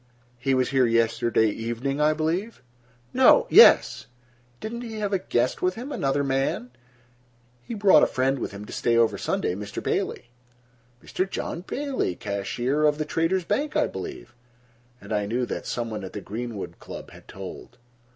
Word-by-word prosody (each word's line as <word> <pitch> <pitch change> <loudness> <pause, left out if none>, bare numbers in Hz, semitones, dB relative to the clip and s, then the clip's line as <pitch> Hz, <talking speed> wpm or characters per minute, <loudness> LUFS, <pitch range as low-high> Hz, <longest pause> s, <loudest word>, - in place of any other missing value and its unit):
"He 135 +2 +1
was 130 -1 +1
here 130 -2 +3
yesterday 115 -1 +2
evening, 120 +6 -3
I 155 +1 +4
believe?" 165 - -2 0.5
"No—yes." - - +6 0.5
"Didn't 235 +2 -5
he 225 -2 -7
have 205 -1 -2
a 195 - +2
guest 125 -8 0
with 185 0 +1
him? 255 +5 -7
Another 140 - 0
man?" 135 -2 -1 0.9
"He 230 - -7
brought 200 -2 +6
a - - +5
friend 135 +1 0
with - - -4
him 100 +1 -8
to - - -10
stay 120 -1 +1
over 115 -1 +3
Sunday, - - -1
Mr. 100 +2 -6
Bailey." 120 - -2 0.7
"Mr. 190 +1 -2
John 170 - -4
Bailey, 265 - -2
the - - -15
cashier 120 - -2
of 150 -1 +3
the 155 - -2
Traders' 165 +3 0
Bank 295 - -1
I - - +3
believe." 90 -10 -7 0.7
And 100 +2 -7
I 105 -1 0
knew 120 +4 -1
that - - -5
some 120 -2 -3
one 105 -2 -5
at 95 - -8
the 105 - -4
Greenwood 110 0 -6
Club - - -9
had - - -15
told. 95 +5 -9
130 Hz, 170 wpm, -25 LUFS, 115-175 Hz, 0.9 s, No—yes